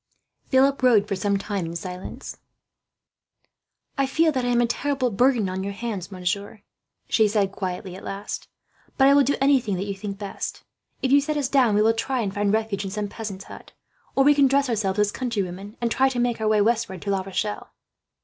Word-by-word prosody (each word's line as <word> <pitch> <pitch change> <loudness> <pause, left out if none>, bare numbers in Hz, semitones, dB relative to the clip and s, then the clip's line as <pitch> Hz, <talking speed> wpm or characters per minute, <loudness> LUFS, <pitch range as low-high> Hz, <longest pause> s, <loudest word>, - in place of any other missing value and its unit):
Philip 270 +1 +3
rode 230 -5 +4
for 200 - -1
some 200 +1 0
time 200 -1 -3
in 165 - -6
silence. 180 +2 -7 1.6
"I 275 - +3
feel 320 +4 +3
that 260 -4 -1
I - - -1
am 240 -1 +2
a - - +4
terrible 255 +1 -1
burden 240 -1 +3
on 185 +1 -3
your 200 +1 -4
hands, 200 -4 -5
monsieur," 195 +3 -3 0.4
she 220 -2 +3
said 200 -2 +1
quietly, 185 -1 -5
at 190 - -11
last; 200 +1 -6 0.5
"but 270 - +6
I 280 - +7
will 285 - +6
do 280 +1 +2
anything 265 -7 +3
that 185 +2 -3
you 200 - -3
think 200 0 -6
best. 200 -1 -6 0.4
If 260 - +1
you 285 +1 +6
set 300 +1 -2
us 280 -3 0
down, 255 -7 +3
we 210 - +4
will 225 +1 +4
try 245 +3 -1
and 200 -3 -2
find 205 0 +1
refuge 220 -2 -1
in 195 - -4
some 205 +1 -3
peasant's 200 -3 -6
hut; - - -12 0.4
or 270 - +5
we 290 +2 +6
can 280 -1 +4
dress 275 0 +2
ourselves 205 -4 0
as 210 0 +2
countrywomen, 205 -4 -4
and 235 -1 -1
try 265 +2 +3
to 260 - -5
make 240 -2 0
our 215 - +1
way 215 -1 +3
westward 220 -4 0
to 200 - -1
La 195 -1 +1
Rochelle." 195 +2 -4
215 Hz, 215 wpm, -24 LUFS, 195-255 Hz, 1.6 s, I